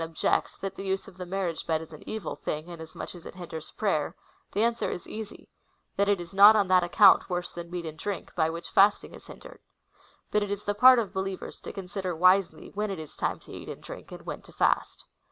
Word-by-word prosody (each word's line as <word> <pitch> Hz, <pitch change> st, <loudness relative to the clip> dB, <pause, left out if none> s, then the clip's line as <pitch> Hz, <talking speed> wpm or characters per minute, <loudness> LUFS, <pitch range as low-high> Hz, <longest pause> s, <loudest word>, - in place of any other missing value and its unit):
229 165 Hz, -1 st, -6 dB, 0.2 s
objects, -, -, -15 dB
that 195 Hz, 0 st, -4 dB
the 195 Hz, -, -6 dB
use 190 Hz, 0 st, -2 dB
of 195 Hz, -, -13 dB
the 180 Hz, -1 st, -6 dB
marriage 180 Hz, -3 st, -3 dB
bed 160 Hz, -1 st, +1 dB
is 160 Hz, 0 st, -10 dB
an 155 Hz, -, -11 dB
evil 220 Hz, -1 st, -4 dB
thing, 155 Hz, +3 st, -4 dB
inasmuch 160 Hz, -2 st, -8 dB
as 175 Hz, -2 st, -11 dB
it -, -, -10 dB
liinders 170 Hz, -3 st, -8 dB
prayer, 190 Hz, -9 st, 0 dB, 0.4 s
the 205 Hz, -, +1 dB
answer 235 Hz, 0 st, +1 dB
is 175 Hz, -, -6 dB
easy 215 Hz, -1 st, -8 dB, 0.3 s
— -, -, -45 dB
that 200 Hz, 0 st, +2 dB
it 200 Hz, -2 st, +3 dB
is 175 Hz, +1 st, -8 dB
not 205 Hz, +3 st, +9 dB
on 205 Hz, -3 st, +3 dB
that 185 Hz, -1 st, +5 dB
account 195 Hz, +3 st, +6 dB
worse 175 Hz, -1 st, -2 dB
than 170 Hz, 0 st, -7 dB
meat 175 Hz, -1 st, -5 dB
and 160 Hz, 0 st, -7 dB
drink, 200 Hz, -1 st, -4 dB
by 160 Hz, -2 st, +2 dB
which 170 Hz, +1 st, -6 dB
fasting 200 Hz, +1 st, +4 dB
is -, -, -13 dB
hindered. -, -, -12 dB, 0.7 s
But 210 Hz, -, +2 dB
it 205 Hz, -, -2 dB
is 205 Hz, 0 st, -3 dB
the 205 Hz, -, +1 dB
part 255 Hz, +4 st, +8 dB
of 225 Hz, -5 st, -1 dB
believers 190 Hz, 0 st, -4 dB
to -, -, -7 dB
con 195 Hz, -2 st, -7 dB
sider 185 Hz, -1 st, -3 dB
wisely 185 Hz, +2 st, +3 dB
when 210 Hz, +1 st, -2 dB
it 195 Hz, -, -3 dB
is 155 Hz, -2 st, -9 dB
time -, -, -1 dB
to -, -, -14 dB
eat -, -, -8 dB
and -, -, -8 dB
drink, -, -, -10 dB
and -, -, -9 dB
when -, -, -5 dB
to -, -, -16 dB
fast. -, -, 0 dB
185 Hz, 245 wpm, -28 LUFS, 170-200 Hz, 0.7 s, not